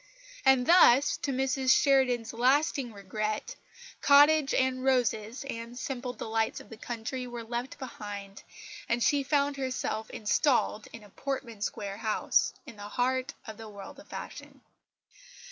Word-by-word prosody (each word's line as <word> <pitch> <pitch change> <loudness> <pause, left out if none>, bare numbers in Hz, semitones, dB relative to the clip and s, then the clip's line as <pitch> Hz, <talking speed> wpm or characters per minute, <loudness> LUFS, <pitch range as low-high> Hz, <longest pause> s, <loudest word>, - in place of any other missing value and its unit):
And 265 -2 +4
thus, 285 -5 +6
to 280 - -3
Mrs 265 0 0
Sheridan's 255 -5 +2
lasting 265 +1 +2
regret, 215 +1 -4 0.5
cottage 290 0 +6
and 260 0 +1
roses 245 -3 0
and 235 -1 -6
simple 250 -1 -4
delights 225 -2 -2
of - - -14
the 225 - -9
country 240 +3 -5
were 240 -1 -6
left 240 +3 -5
behind, 205 -6 -8 0.5
and 235 0 +1
she 285 -1 +3
found 280 0 0
herself 255 -4 -3
installed 220 -1 +1
in 230 - -11
a 205 - -15
Portman 260 -5 -5
Square 200 -1 -4
house, 215 -1 +1
in 250 -7 -12
the 205 0 -8
heart 255 +4 -1
of 220 -2 -8
the 225 -1 -9
world 200 -2 -10
of - - -15
fashion. - - -9
245 Hz, 145 wpm, -29 LUFS, 220-270 Hz, 0.5 s, thus